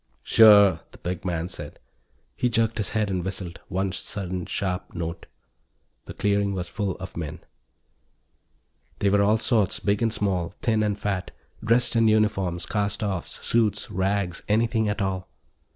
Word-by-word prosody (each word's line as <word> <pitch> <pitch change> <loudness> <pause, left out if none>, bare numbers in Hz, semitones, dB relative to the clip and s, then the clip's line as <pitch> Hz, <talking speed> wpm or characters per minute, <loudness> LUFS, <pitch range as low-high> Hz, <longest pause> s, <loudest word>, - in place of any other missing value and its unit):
"Sure," 105 -3 +7
the - - -16
big 90 0 -4
man 85 -2 -1
said. 90 - -7 0.6
He 125 - +1
jerked 115 -1 +1
his 105 - -1
head 105 -2 +1
and 90 -2 -1
whistled, 95 -2 -5
one 95 0 -1
sudden 90 -1 -5
sharp 90 -1 -3
note. 85 0 -5 0.8
The - - -9
clearing 100 -1 +1
was 90 -2 -3
full 100 -4 -2
of 95 -1 -9
men. 80 -3 -5 1.6
They 100 - +1
were 100 0 +4
all 105 +2 +4
sorts, 110 -3 +1
big 100 +1 0
and 115 -1 +2
small, 95 -5 -1
thin 110 -2 +2
and 105 -1 0
fat, 100 -3 -2 0.3
dressed 120 +2 +3
in 115 -1 +4
uniforms, 105 -5 +1
cast 105 +1 -1
offs, 95 -5 -4
suits, 105 -3 +1
rags, 95 -2 -1
anything 110 0 +2
at 105 0 -1
all. 95 -1 -3
100 Hz, 155 wpm, -25 LUFS, 90-110 Hz, 1.6 s, Sure